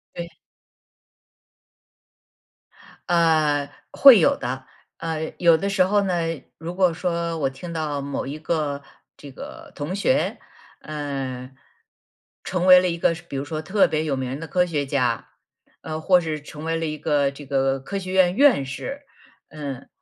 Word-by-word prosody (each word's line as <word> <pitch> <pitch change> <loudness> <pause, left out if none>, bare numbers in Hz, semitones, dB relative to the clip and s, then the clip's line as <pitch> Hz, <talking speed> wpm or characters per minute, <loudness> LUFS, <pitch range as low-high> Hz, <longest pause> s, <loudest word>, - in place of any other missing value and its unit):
对。 170 -1 -7 2.7
呃， 155 -4 +3 0.2
会 265 -6 +9
有 160 - +4
的。 130 +2 -5 0.3
呃， 160 -1 -4
有 170 -2 +5
的 195 +5 -2
时 195 -1 +3
候 205 +2 +2
呢， 190 -3 0 0.4
如 165 +2 -6
果 185 -2 +3
说 170 -1 -2
我 135 -3 +1
听 135 +6 -9
到 150 -3 -2
某 140 0 -4
一 145 +3 -6
个 150 -3 -2 0.4
这 145 - -11
个 - - -10
同 150 +6 -4
学， 260 +8 +1 0.4
嗯， 135 -4 -5 0.9
成 180 -1 -1
为 185 -1 +9
了 180 - +1
一 170 - -2
个 165 - +2
说 170 +1 -11
比 - - -6
如 135 +1 -3
说 155 +1 -4
特 190 +5 +3
别 155 0 -1
有 145 -3 0
名 130 +1 -4
的 165 - -7
科 180 +2 +2
学 150 -5 -2
家， 125 -4 0 0.5
呃， 155 0 -5
或 180 +2 +5
是 155 -2 -4
成 150 +1 -9
为 165 0 0
了 165 - -2
一 155 -1 -3
个， 145 -2 +1
这 140 +1 -11
个 135 0 +1
科 195 +9 -5
学 185 -1 -6
院 185 -1 +4
院 260 - +5
士， 275 - -6 0.5
嗯， 140 -4 -7
155 Hz, 175 characters per minute, -23 LUFS, 140-175 Hz, 2.7 s, 会